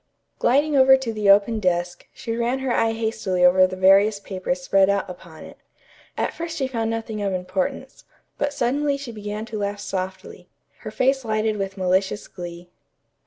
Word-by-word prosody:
Gliding 285 +5 +2
over 265 0 +7
to 255 -4 -4
the 210 -2 0
open 205 +3 +4
desk, 175 -2 -1
she 230 -1 -5
ran 240 +2 0
her 265 -2 -2
eye 225 -1 +1
hastily 220 -5 0
over 185 +1 +6
the 185 - -6
various 195 +3 +4
papers 185 -2 -4
spread 195 +2 +3
out 200 -1 0
upon 175 -3 -11
it. - - -12 0.6
At - - -1
first 330 -1 -6
she 270 - 0
found 230 -4 -2
nothing 225 -1 -4
of 200 -1 -1
importance, 185 +1 -4 0.4
but 285 - 0
suddenly 285 +2 0
she 275 -3 -7
began 210 0 -6
to 220 -2 -6
laugh 200 0 -3
softly, 190 -1 -6 0.3
her - - -7
face 265 +1 +1
lighted 215 -1 -1
with 195 0 -4
malicious 190 +2 0
glee. 175 -1 -9
210 Hz, 175 wpm, -23 LUFS, 185-235 Hz, 0.6 s, over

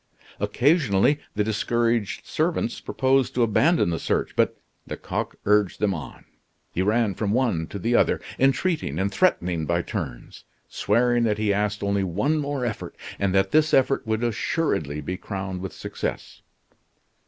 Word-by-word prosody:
Occasionally 125 - +2 0.2
the 105 - +2
discouraged 115 0 0
servants - - -1
proposed 130 -1 +1
to 120 - +3
abandon 125 - +3
the 80 - -2
search; - - -1
but - - +2 0.3
Lecoq - - -4
urged 105 -2 +2
them 105 -2 +1
on. 75 -7 -8 0.5
He 90 - -1
ran 110 +1 +2
from 100 +2 -1
one 110 -11 +1
to - - -6
the 115 +6 -1
other, - - +3 0.2
entreating 135 - +1
and 95 +2 0
threatening 85 - +1
by - - +1
turns, - - -6 0.2
swearing 120 +3 +2
that 105 -2 +1
he 105 -1 +1
asked 105 +1 -1
only 100 -1 +1
one 105 - 0
more 140 -3 -2
effort, 110 -3 -5 0.2
and 100 -1 +1
that 95 0 +2
this 155 0 +4
effort 135 -2 +2
would 110 +1 0
assuredly 105 - -1
be 90 +5 -4
crowned 95 -2 -5
with 95 -2 -5
success. - - -5
105 Hz, 155 wpm, -24 LUFS, 95-125 Hz, 0.5 s, this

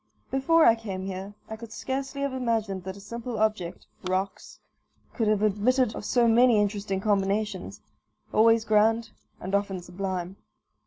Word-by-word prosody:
Before 320 +5 +4
I 230 - +8
came 200 -5 -5
here 195 +1 -6
I 220 - -6
could 225 0 -10
scarcely 270 +4 -4
have 280 -1 -1
imagined 220 -7 -1
that 190 +1 -6
a - - -11
simple 235 +3 -6
object 210 -5 -1 0.2
(rocks) 190 +1 -3 0.5
could 225 -3 0
have 210 -1 +2
admitted 220 +4 +2
of - - -6
so 240 -2 +3
many 235 -1 +5
interesting 200 -1 -1
combinations, 200 - -1 0.5
always 225 0 +5
grand 220 +1 +3 0.3
and 185 +2 -6
often 200 -2 0
sublime. 185 0 -5
215 Hz, 150 wpm, -27 LUFS, 195-230 Hz, 0.5 s, I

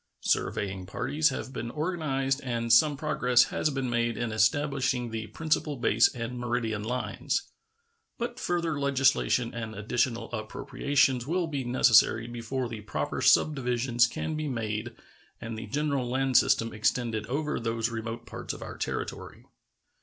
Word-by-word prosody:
Surveying 95 -2 -1
parties 155 - +1
have 130 -1 -5
been 120 -1 -4
organized 140 -3 -1
and 115 -2 0
some 145 +4 +5
progress 125 -5 +3
has 155 - +1
been 135 -3 -2
made 120 -1 0
in 120 -1 -2
establishing 125 +2 +1
the 110 -1 -4
principal 155 0 -1
base 115 -2 +4
and 120 +1 -4
meridian 120 -3 -1
lines. 125 +3 -2 0.7
But 240 +1 -4
further 170 - -1
legislation 135 -3 +2
and 115 -1 -5
additional 115 +3 -1
appropriations 125 +3 0
will 175 +2 0
be 145 -4 -3
necessary 120 -2 +4
before 120 +2 -3
the 115 -2 -7
proper 75 -8 -3
subdivisions 125 -4 +3
can 160 - -4
be 155 0 -2
made 115 -2 -3 0.4
and 115 0 -6
the 110 0 -7
general 140 0 -1
land 130 +1 0
system 115 -1 +4
extended 110 0 0
over 150 +4 -1
those 115 0 -1
remote 115 +1 -5
parts - - -6
of - - -8
our - - -8
territory. - - -5
125 Hz, 145 wpm, -28 LUFS, 115-140 Hz, 0.7 s, some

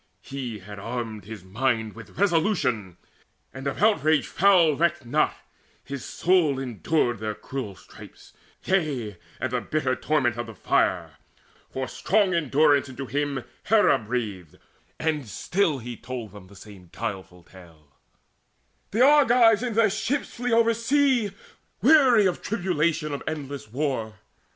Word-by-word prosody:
He 130 -5 -6
had 100 +1 -10
armed 115 -2 -5
his 110 -3 -9
mind 110 +2 -1
With 115 +1 -13
resolution, 165 - +1 0.6
and 135 +2 -6
of 140 - -3
outrage 155 - +3
foul 175 -5 +4
Recked 165 -3 0
not; 150 +6 +1 0.5
his 140 -1 -7
soul 170 -6 +2
endured 125 -1 -1
their 110 -1 -3
cruel 125 -8 -6
stripes, - - -15 0.3
Yea, 140 - -1 0.2
and 130 0 -2
the 125 -1 -1
bitter 130 -3 -1
torment 130 -7 0
of 120 - -4
the 115 - -10
fire; - - 0 0.5
For 130 0 -4
strong 200 -2 +1
endurance 145 -3 +3
into 130 +1 -6
him 140 -1 -2 0.2
Hera 220 0 +4
breathed; 105 -7 -5 0.4
And 155 -5 -1
still 170 - 0
he 120 -1 -7
told 125 -4 -7
them 100 -3 -13
the 100 - -16
same 95 -2 -14
guileful 90 -2 -6
tale: 80 -7 -18 0.9
"The 235 +5 +4
Argives 245 -6 +5
in 245 -3 -3
their 220 -2 +4
ships 280 +8 -2
flee 245 +1 -3
oversea 230 +1 +2 0.5
Weary 255 -6 +6
of 185 - 0
tribulation 170 -6 -1
of 140 - -4
endless 140 -7 -5
war. 125 -5 -2
140 Hz, 135 wpm, -25 LUFS, 115-185 Hz, 0.9 s, Weary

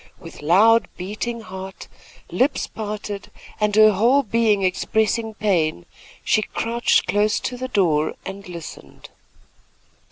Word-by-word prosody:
With 165 -4 -12
loud 210 +9 +4
beating 215 +5 -4
heart, 190 -2 -9 0.4
lips 270 +3 +1
parted 210 -2 -6 0.3
and 210 -1 +1
her 215 0 +7
whole 240 +8 +3
being 220 -3 +1
expressing 220 +4 0
pain, 170 - 0 0.4
she 215 - +2
crouched 235 +2 0
close 210 +1 +1
to 250 - -3
the 255 +1 -5
door 165 -10 +1
and 195 -1 -8
listened. 170 -2 -10
210 Hz, 120 wpm, -22 LUFS, 190-225 Hz, 0.4 s, her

